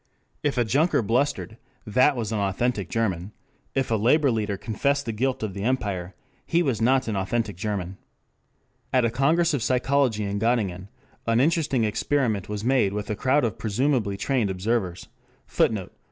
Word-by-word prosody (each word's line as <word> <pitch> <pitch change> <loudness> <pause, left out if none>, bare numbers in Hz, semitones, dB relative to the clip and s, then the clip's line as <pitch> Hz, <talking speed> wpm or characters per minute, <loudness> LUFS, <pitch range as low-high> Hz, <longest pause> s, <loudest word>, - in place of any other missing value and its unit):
If 145 -3 -1
a 120 - +3
junker 140 +3 +2
blustered, 115 0 0 0.3
that 130 +6 +3
was 115 -3 -3
an 110 - -1
authentic 100 0 -1
German; 95 -2 -2 0.4
if 135 -3 0
a - - +3
labor 140 +4 +4
leader 105 -3 -1
confessed 140 +7 -1
the 115 - -2
guilt 125 +3 -1
of 105 -3 -3
the 100 - -6
empire, 100 -6 -2 0.3
he 170 +1 +1
was 130 -8 -1
not 130 +2 +3
an 110 - -1
authentic 100 +2 -1
German. 95 -1 -4 0.9
At 130 -2 +3
a 115 - +1
Congress 160 +7 +2
of 140 - 0
Psychology 125 -2 +1
in 100 0 -2
Göttingen 100 -5 0 0.4
an 115 0 +3
interesting 145 -4 +2
experiment 110 -1 0
was 105 0 -4
made 125 -6 +2
with 105 0 -3
a - - -1
crowd 130 +6 +2
of 110 - -3
presumably 110 -2 0
trained 125 -3 0
observers. 95 -1 -2 0.4
[Footnote: 100 -5 0
A. - - -41
115 Hz, 170 wpm, -25 LUFS, 100-130 Hz, 0.9 s, labor